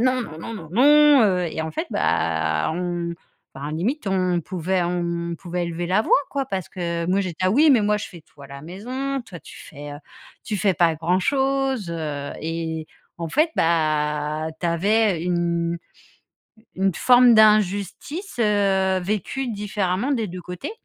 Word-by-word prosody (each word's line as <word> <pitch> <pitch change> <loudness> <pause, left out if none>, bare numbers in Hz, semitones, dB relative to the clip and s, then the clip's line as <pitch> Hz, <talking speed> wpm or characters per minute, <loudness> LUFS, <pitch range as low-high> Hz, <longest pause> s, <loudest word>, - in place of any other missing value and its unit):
non, 255 +1 +2
non, 155 -8 -9
non, 230 - -6
non, 165 -7 -9
non», 295 +4 +6
heu, 185 -4 +2
et 160 - -3
en 160 - -4
fait, - - -3
bah, 80 - 0
on 175 -1 -3 0.4
enfin 140 +2 -6
limite, 215 - -2
on 185 -2 +1
pouvait 180 +2 -1
on 170 -1 -2
on - - -3
pouvait 175 +1 -4
élever 170 0 -4
la 185 +4 +2
voix, - - +4
quoi 275 -2 -2
parce 190 -7 -4
que 170 -2 -3
moi, 190 +3 +2
j'ai 185 -2 -2
dit: - - -18
«Ah 185 - +3
oui, 295 +9 +5
mais 245 -6 +5
moi, 210 0 +2
je - - -5
fais 170 -4 -13
tout 150 - -23
à 140 - -10
la 140 0 -10
maison. 255 - -4
Toi, 185 -8 -11
tu - - -13
fais, 145 0 -10
heu, - - -7 0.5
tu 215 - -3
fais 195 0 +2
pas 170 -1 +3
grand 165 +4 0
chose», 270 -4 0
heu, 150 -4 -4
et 160 0 -4 0.3
en 165 -1 -4
fait, 310 - +2
bah, 155 -1 0
tu 175 - -2
avais 195 +2 +2
une 170 -1 0 1.0
une 195 0 +1
forme 250 -1 +6
d'injustice, 215 - +2
heu, 195 -3 +2
vécue 215 +7 -2
différemment, 205 +2 -1
des 230 -6 0
2 180 0 -7
côtés. 180 - -6
180 Hz, 180 wpm, -23 LUFS, 165-215 Hz, 1.0 s, non